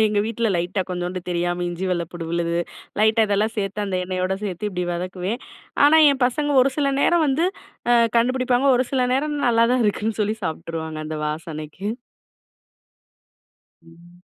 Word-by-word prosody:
எங்க 210 -1 +1
வீட்ல 230 0 -1
லைட்டா 180 +3 -1
கொஞ்சோண்டு 180 0 -3
தெரியாம 175 0 -1
இஞ்சி 175 +2 -4
வெள்ளப்பூடு 170 -1 -3
விழுது, 170 0 0 0.4
லைட்டா 220 +1 +4
இதெல்லாம் 210 +2 +1
சேத்து 205 0 -2
அந்த 190 -2 -1
எண்ணெயோட 185 +1 -1
சேத்து 200 +1 -3
இப்டி 180 -1 -2
வதக்குவேன். 185 +6 -3 0.5
ஆனா 315 +2 +6
என் 265 - -3
பசங்க 290 +4 -1
ஒரு 270 - +2
சில 280 -1 +2
நேரம் 340 +2 +3
வந்து 310 +6 +2 0.4
அ - - +6 0.2
கண்டுபிடிப்பாங்க. 255 +2 +1
ஒரு 255 - +2
சில 260 - +2
நேரம் 295 +2 -1
நல்லா 230 -1 +4
தான் 255 -1 +2
இருக்குன்னு 215 +1 -1
சொல்லி 210 +1 -1
சாப்ட்டுருவாங்க 160 -1 -4
அந்த 155 0 -4
வாசனைக்கு. 155 +3 -6 2.0
ம். 170 +2 -19
195 Hz, 150 wpm, -22 LUFS, 175-240 Hz, 2.0 s, ஆனா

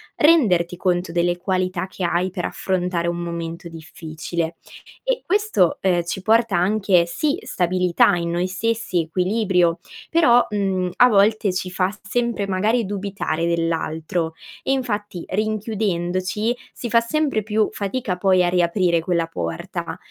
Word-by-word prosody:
renderti 200 - +4
conto 180 -1 0
delle 175 +1 +1
qualità 185 0 -1
che 185 - -7
hai 175 +2 +1
per 180 -1 -4
affrontare 180 -2 -1
un 170 0 -1
momento 170 0 -5
difficile; 165 +1 -5 0.5
e - - 0
questo, 395 - +2
uhm, 180 -2 +2
ci 175 +3 -4
porta 225 -1 +3
anche, 190 -1 +3
sì 290 - -1
stabilità 180 -1 +2
in 170 -1 -2
noi 175 +1 0
stessi, 210 -1 -1
equilibrio, 180 0 +1 0.3
però, 245 -8 +5
mhmm, 190 -3 -1
a 250 - +7
volte 210 -1 +3
ci 185 0 -3
fa 185 0 +1 0.2
sempre, 235 -3 -1
magari, 210 +5 +1
dubitare 195 -4 -2
dell'altro. 165 0 -1 0.3
E - - 0
infatti, 210 -8 -3
rinchiudendoci, 210 0 -1 0.2
si 240 - -6
fa 230 +1 +5
sempre 275 -1 0
più 215 +1 +1
fatica 200 -1 -3
poi, 185 -1 +3
a 175 - +2
riaprire 175 -1 +2
quella 170 0 0
porta, 85 - -5
185 Hz, 135 wpm, -22 LUFS, 175-215 Hz, 0.5 s, a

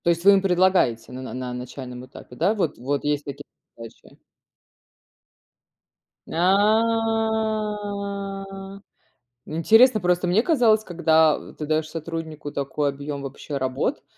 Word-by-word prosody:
То - - +3
есть 170 +1 0
вы 200 - +9
им 195 - +4
предлагаете 180 - +2
на 130 - -7
на 130 - -7
на 125 -1 -5
начальном 125 0 -8
этапе, 125 -1 -13
да? 175 +10 +2
Вот 185 -7 -1
вот 140 +3 -2
есть 145 0 0
такие 140 -1 -7 0.3
задачи. 115 -1 -13 2.1
А. 205 -1 0 0.7
Интересно 220 +9 +5
просто: 180 -1 +1
мне 185 +5 +3
казалось, 235 -9 +3
когда 160 -4 +2
ты 155 - -6
даёшь 155 +1 0
сотруднику 160 -2 -6
такой 140 +1 -1
объём 140 +1 -5
вообще 140 +1 -6
работ, 130 -1 -2
170 Hz, 125 wpm, -23 LUFS, 140-200 Hz, 2.1 s, вы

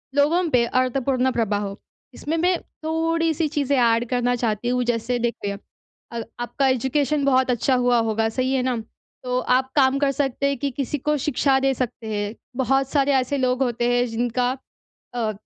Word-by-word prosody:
लोगों 305 +5 +3
पे 245 -3 +3
अर्थपूर्ण 255 +1 +1
प्रभाव 210 -4 -1
हो। 200 0 -7 0.4
इसमें 315 +3 -3
मैं 355 +1 +2 0.3
थोड़ी-सी 325 0 0
चीज़ें 285 -2 0
ऐड 235 -1 +3
करना 245 -1 +1
चाहती 230 -1 -1
हूँ। 250 0 +1
जैसे 235 +1 0
देखिए, 205 -4 -2 0.5
अ, 235 -1 -4 0.2
आपका 270 +3 0
एजुकेशन 270 +3 +1
बहुत 260 -1 +3
अच्छा 250 +2 +1
हुआ 245 -1 +3
होगा 220 +1 +1
सही 255 +3 -1
है 265 - +2
ना? 255 -1 0 0.5
तो 250 0 0
आप 260 +1 +1
काम 270 -1 +4
कर 280 -1 +2
सकते 275 0 -1
हैं, 280 - -1
कि 280 +1 -2
किसी 275 +3 -3
को 300 +2 0
शिक्षा 270 -1 +1
दे 270 0 +2
सकते 245 -3 -4
हैं। 205 +2 -3 0.3
बहुत 270 +1 +1
सारे 280 -1 +2
ऐसे 265 +1 +1
लोग 255 0 +1
होते 240 -1 0
हैं 245 - +2
जिनका 245 +2 0 0.6
अ, 225 -3 0
255 Hz, 180 wpm, -23 LUFS, 240-275 Hz, 0.6 s, काम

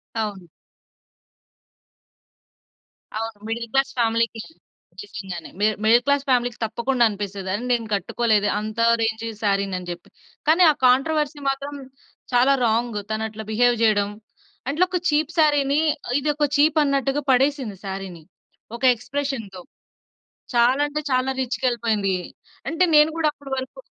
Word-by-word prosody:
అవును. 205 -5 -4 2.7
అవును. 225 -1 -4
Middle 230 +1 -3
class 270 0 +2
ఫ్యామిలీ‌కి 230 0 +1 0.6
నిజంగానే. 195 -4 -8
మిడ్ 215 +1 +2
మిడిల్ 235 +3 +5
క్లాస్ 280 0 +1
ఫ్యామిలీ‌కి 245 -2 +1
తప్పకుండా 235 +3 0
అనిపిస్తది 200 -2 -5
అరే 210 +5 -2
నేను 230 -2 0
కట్టుకోలే‌దే 210 +2 +1
అంత 215 +1 -6 0.2
రేంజ్ 225 0 -1 0.2
సారీని 195 -2 +1
అని 180 -1 -9
చెప్పి. 175 0 -10 0.4
కానీ 330 +4 +5
ఆ - - -1
కాంట్రోవర్సీ 295 +3 +1
మాత్రం 280 +1 -4 0.6
చాలా 250 +3 +5
రాంగ్ 230 0 0
తను 215 0 -1
అట్లా 220 0 -8
బిహేవ్ 240 +2 +3
చేయడం 205 -2 +3 0.6
అట్లా, 305 +6 +2
ఒక 370 - 0
చీప్ 305 +1 +1
సారీని 290 -2 +3 0.4
ఇది 290 +1 -1
ఒక 300 0 +2
చీప్ 305 +2 +4
అన్నట్టుగా 275 0 0
పడేసింది 260 -5 +1
సారీని 190 -4 -6 0.5
ఒక 235 - -10
ఎక్స్‌ప్రేషన్‌తో. 250 -6 -5 0.9
చాలా 245 +4 +4
అంటే 300 +1 -3
చాలా 255 +1 +1
రీచ్‌కి 260 +1 -3
వెళ్ళిపోయింది. 220 -5 0 0.5
అంటే 330 +3 +2
నేను 300 +1 +6
కూడా 325 -2 +2
అప్పటి 285 -2 -13
వరకు 260 - -7
240 Hz, 130 wpm, -23 LUFS, 215-280 Hz, 2.7 s, నేను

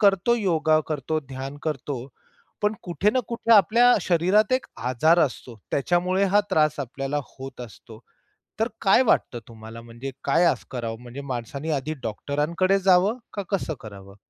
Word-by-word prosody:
करतो 200 +3 +4
योगा, 160 -7 +2
करतो 155 +1 -2
ध्यान 135 +2 -6
करतो 135 -4 -4 0.6
पण 210 +1 +2
कुठे 180 +4 0
ना 255 - +1
कुठे 230 -1 +1
आपल्या 230 +5 +6
शरीरात 185 +7 +2
एक 255 - +1 0.2
आजार 155 +7 +3
असतो, 125 -3 -7
त्याच्यामुळे 180 +6 +1
हा 205 - +7
त्रास 155 -1 +2
आपल्याला 135 +3 -3 0.2
होत 135 -1 -9
असतो. 110 -1 -11 0.6
तर 225 - +2
काय 205 +4 +5
वाटतं 120 - +1
तुम्हाला? 115 0 -11
म्हणजे 120 +4 -8
काय 170 +2 +3
असं - - +1
करावं? 115 -2 -5
म्हणजे 125 +3 -8
माणसांनी 135 +6 -5
आधी 150 +2 -2
डॉक्टरांकडे 150 - 0
जावं 190 +4 +3 0.2
का 200 - -3
कसं 170 -4 -1
करावं? 100 -2 -11
155 Hz, 150 wpm, -24 LUFS, 125-195 Hz, 0.6 s, हा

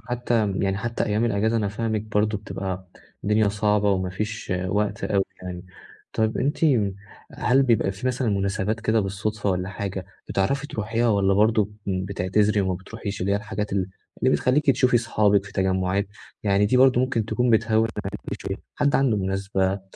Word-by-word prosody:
حتى 120 0 -1 0.2
يعني 95 -1 0
حتى 115 +3 -2
أيام 105 +2 +1
الأجازة 110 +1 +1
أنا 105 -3 0
فاهمِك 110 0 -2
برضه 105 0 0
بتبقى 95 -2 -5 0.4
الدنيا 105 0 +3
صعبة 105 0 +2
وما 95 -1 0
فيش 105 +2 -4
وقت 105 +2 -1
أوي 100 -1 +1 0.2
يعني، 90 -1 -6 0.5
طيب 110 0 0
أنتِ 140 +3 0 0.7
هل 130 +2 +3
بيبقى 115 -6 +2
في 110 +7 -6
مثلًا 125 -2 0
مناسبات 100 +2 -1
كده 110 0 +2
بالصُدفة 105 +1 -2
والّا 90 0 -1
حاجة 95 -1 -5 0.2
بتعرفي 135 +9 0
تروحيها، 115 -1 -1
والّا 100 -2 +3
برضه 105 0 +3 0.2
بتعتذري 100 +2 +1
وما 95 -1 0
بتروحيش 100 +2 -6
اللي 95 +2 0
هي - - +3
الحاجات 105 -1 -4
اللي 95 -1 0 0.4
بتخليكِ 130 +2 +3
تشوفي 125 -1 +3
صحابِك 105 -3 +2
في 100 - -11
تجمُعات، 95 +1 0 0.4
يعني 100 0 +3
دي 125 - +2
برضه 130 -1 +5
ممكن 130 -3 0
تكون 125 +3 0
بتهوّن 110 0 +3 0.2
عليكِ 100 +1 -6
شوية، 95 0 -3 0.2
حد 145 -1 +2
عنده 135 -5 +3
مناسبة 95 0 -1
105 Hz, 160 wpm, -24 LUFS, 95-115 Hz, 0.7 s, برضه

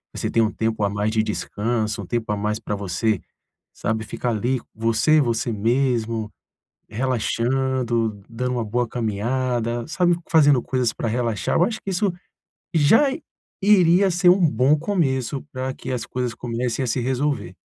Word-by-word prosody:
Você - - -2
tenha 115 -1 +3
um 110 - -1
tempo 110 -1 -1
a 100 - +2
mais 105 +1 -1
de 110 0 +1
descanso, 110 +1 -2
um - - -8
tempo 115 -3 -2
a 105 - -1
mais 105 +1 -1
para 105 -2 -3
você, 100 +1 -1 0.5
sabe, 110 0 -2
ficar 120 +3 -3
ali, 120 +3 -1
você, 115 +8 +3
você 120 -2 0
mesmo, 115 -1 0 0.6
relaxando, 120 -1 -1
dando 125 +2 -3
uma 120 -2 -1
boa 120 +3 -1
caminhada, 120 +1 -1
sabe, 175 +1 +2
fazendo 145 -6 +5
coisas 125 -3 0
para 115 - -3
relaxar. 115 -5 -1
Eu 175 - +5
acho 220 +3 -2
que 195 - -4
isso 190 +1 +1 0.6
já 165 - +5 0.5
iria 190 -1 +5
ser 175 +1 +4
um 180 -1 +5
bom 130 +6 +3
começo 140 - -1
para 130 0 -3
que - - -7
as 125 -3 -2
coisas 125 -2 -3
comecem 120 +1 -2
a - - -2
se 120 - 0
resolver. 130 -6 -1
120 Hz, 165 wpm, -22 LUFS, 110-135 Hz, 0.6 s, fazendo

